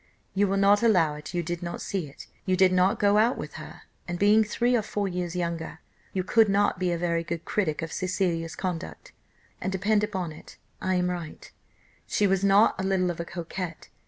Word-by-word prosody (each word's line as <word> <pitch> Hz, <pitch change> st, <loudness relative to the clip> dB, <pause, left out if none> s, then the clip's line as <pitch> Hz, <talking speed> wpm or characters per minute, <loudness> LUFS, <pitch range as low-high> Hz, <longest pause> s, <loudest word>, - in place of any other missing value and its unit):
You 200 Hz, +1 st, +2 dB
will 195 Hz, +1 st, 0 dB
not 200 Hz, +1 st, +5 dB
allow 180 Hz, -10 st, +4 dB
it, 150 Hz, +4 st, -8 dB
you 175 Hz, -, 0 dB
did 170 Hz, +1 st, -4 dB
not 170 Hz, 0 st, -5 dB
see 180 Hz, -7 st, -3 dB
it, 140 Hz, -, -12 dB, 0.2 s
you 185 Hz, -1 st, +1 dB
did 185 Hz, -1 st, +5 dB
not 185 Hz, +4 st, +3 dB
go 205 Hz, 0 st, +4 dB
out 235 Hz, +4 st, +3 dB
with -, -, -6 dB
her, -, -, -11 dB, 0.2 s
and 175 Hz, 0 st, -3 dB
being 210 Hz, +3 st, +5 dB
three 240 Hz, +3 st, +1 dB
or 235 Hz, -, +2 dB
four 205 Hz, -1 st, -2 dB
years 180 Hz, -1 st, -3 dB
younger, 170 Hz, -2 st, -3 dB, 0.3 s
you 185 Hz, -, -1 dB
could 220 Hz, +2 st, +4 dB
not 200 Hz, -2 st, +2 dB
be 180 Hz, -1 st, 0 dB
a 170 Hz, -, 0 dB
very 170 Hz, -1 st, 0 dB
good 170 Hz, 0 st, -5 dB
critic 165 Hz, -7 st, -1 dB
of 165 Hz, -, -5 dB
Cecilia's 175 Hz, -3 st, -1 dB
conduct; 165 Hz, -, -5 dB, 0.5 s
and 190 Hz, -, -2 dB
depend 205 Hz, +3 st, +1 dB
upon 190 Hz, -6 st, -2 dB
it 155 Hz, -, -13 dB, 0.2 s
I 185 Hz, 0 st, 0 dB
am 180 Hz, 0 st, +1 dB
right, 170 Hz, -3 st, -7 dB, 0.6 s
she 210 Hz, -, +1 dB
was 195 Hz, 0 st, +2 dB
not 200 Hz, +3 st, +5 dB
a -, -, -3 dB
little 190 Hz, -2 st, +1 dB
of 170 Hz, -, -8 dB
a 170 Hz, -, -3 dB
coquette. 170 Hz, 0 st, -6 dB
185 Hz, 215 wpm, -27 LUFS, 170-200 Hz, 0.6 s, not